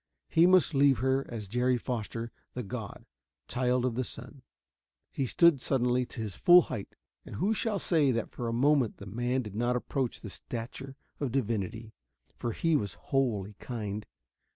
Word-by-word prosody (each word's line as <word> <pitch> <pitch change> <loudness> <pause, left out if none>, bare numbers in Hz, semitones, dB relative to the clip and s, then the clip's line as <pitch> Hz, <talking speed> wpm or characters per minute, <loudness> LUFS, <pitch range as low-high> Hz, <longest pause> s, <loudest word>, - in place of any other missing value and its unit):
He 165 +2 +5
must 185 -3 +5
leave 140 -2 +5
her 130 +3 +1
as 110 -4 -6
Jerry 125 +4 +1
Foster, 115 -1 -4 0.2
the 125 - -3
god, 110 -1 -7 0.4
child 125 0 +1
of 125 - 0
the 130 +3 -1
sun. 125 +3 -8 0.7
He 135 - -1
stood 170 -1 +4
suddenly 125 -1 +1
to - - -6
his 105 -5 -4
full 175 0 +7
height, 110 -6 -6 0.3
and - - -9
who 205 - +1
shall 220 -1 -1
say 160 -6 +2
that 115 -3 -1
for 120 - -4
a - - -1
moment 130 0 +2
the 100 - -10
man 120 +5 -1
did 105 -3 -8
not 120 +3 0
approach 125 0 -2
the 105 - -7
stature 130 +6 -7 0.2
of 140 -4 -1
divinity 110 -2 -2 0.4
for 120 - -3
he 165 +7 +1
was 100 -8 -1
wholly 110 -7 -1
kind. 105 -4 -5
125 Hz, 175 wpm, -30 LUFS, 115-135 Hz, 0.7 s, full